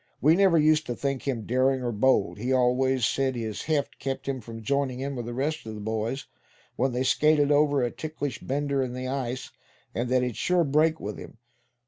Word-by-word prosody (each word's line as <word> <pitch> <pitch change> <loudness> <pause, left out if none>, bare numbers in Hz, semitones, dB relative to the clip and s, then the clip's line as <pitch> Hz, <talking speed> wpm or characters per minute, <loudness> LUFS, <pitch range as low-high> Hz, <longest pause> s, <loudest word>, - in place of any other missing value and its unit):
We 155 +5 +5
never 190 -3 +4
used 155 0 +3
to 120 - -2
think 140 0 -3
him 120 -6 -2
daring 130 +1 +1
or 120 - -1
bold. 115 0 +2
He 125 +4 -2
always 130 0 +2
said 130 +2 0
his 110 -3 -4
heft 150 -3 -1
kept 135 0 -4
him 135 -2 -2
from 115 0 -9
joining 135 +1 0
in 140 +1 -3
with 120 -2 -5
the 120 - -4
rest 155 +4 -1
of 110 - -6
the - - -7
boys, 110 +5 -3 0.5
when 130 +2 +1
they 125 +1 -1
skated 150 +2 +3
over 145 -2 +3
a 120 - 0
'ticklish 145 -6 -5
bender' 140 0 -1
in 125 -2 -2
the 130 0 -4
ice; 130 -1 -3 0.4
and 120 +1 -2
that 130 0 +3
it'd 125 -3 -3
sure 180 -1 +2
break 155 +2 +2
with 105 0 -6
him. - - -11
130 Hz, 210 wpm, -27 LUFS, 120-145 Hz, 0.5 s, We